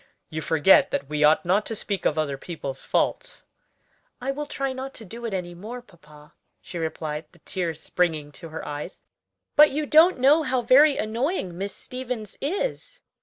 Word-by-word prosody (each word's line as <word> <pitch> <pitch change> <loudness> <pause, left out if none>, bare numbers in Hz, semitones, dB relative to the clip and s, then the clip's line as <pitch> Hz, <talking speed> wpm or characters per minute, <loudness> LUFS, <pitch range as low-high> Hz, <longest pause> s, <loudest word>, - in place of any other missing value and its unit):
"You 155 0 -3
forget 160 +4 +5
that 140 - -2
we 150 0 0
ought 150 +3 +5
not 190 +4 +3
to 225 - -3
speak 200 -2 -1
of 155 - -1
other 150 -3 0
people's 135 -3 -7
faults." - - -1 0.8
"I 265 +2 -2
will 295 +2 -5
try 275 -2 -2
not 265 +1 -7
to 220 - -8
do 235 +5 -8
it - - -5
any 175 -2 -4
more, 215 +8 -7
papa," 150 -9 -18 0.3
she 175 - -8
replied, 155 -1 -4
the 175 - -20
tears 170 -4 -3
springing 160 -5 -1
to 165 +2 -10
her 160 - -7
eyes; 145 0 -6 0.5
"but 300 0 +8
you 300 +2 -2
don't 320 +4 +6
know 280 +5 +5
how 260 -4 0
very 280 +5 +6
annoying 225 - -2
Miss 195 +2 -4
Stevens 250 -5 -6
is. - - -3
200 Hz, 180 wpm, -25 LUFS, 160-265 Hz, 0.8 s, but